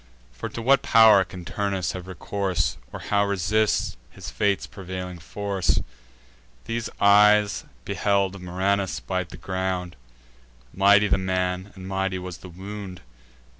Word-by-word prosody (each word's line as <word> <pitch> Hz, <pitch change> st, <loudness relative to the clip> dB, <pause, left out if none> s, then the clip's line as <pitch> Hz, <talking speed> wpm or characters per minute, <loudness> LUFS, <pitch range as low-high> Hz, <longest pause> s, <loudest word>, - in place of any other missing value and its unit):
For -, -, -6 dB
to 115 Hz, -, -6 dB
what 135 Hz, +3 st, +5 dB
pow'r 110 Hz, -4 st, +7 dB
can 90 Hz, -2 st, -10 dB
Turnus 100 Hz, -1 st, -2 dB
have 90 Hz, 0 st, -7 dB
recourse, 95 Hz, -1 st, -2 dB
Or -, -, -7 dB
how 100 Hz, -1 st, +1 dB
resist 100 Hz, -4 st, +1 dB
his -, -, -9 dB
fate's 100 Hz, -2 st, 0 dB
prevailing 90 Hz, -2 st, -7 dB
force? 100 Hz, +1 st, -1 dB, 0.9 s
These 115 Hz, 0 st, -3 dB
eyes 105 Hz, 0 st, +5 dB, 0.2 s
beheld 100 Hz, -1 st, 0 dB
Murranus 95 Hz, -3 st, -1 dB
bite 85 Hz, +9 st, -3 dB
the -, -, -10 dB
ground: 95 Hz, -1 st, -3 dB, 0.8 s
Mighty 100 Hz, +2 st, +5 dB
the 95 Hz, -, +2 dB
man, 95 Hz, +1 st, -1 dB
and 95 Hz, -1 st, -9 dB
mighty 95 Hz, -1 st, -1 dB
was 90 Hz, -1 st, -7 dB
the 90 Hz, -, -11 dB
wound. 95 Hz, 0 st, -8 dB
95 Hz, 130 wpm, -25 LUFS, 90-100 Hz, 0.9 s, pow'r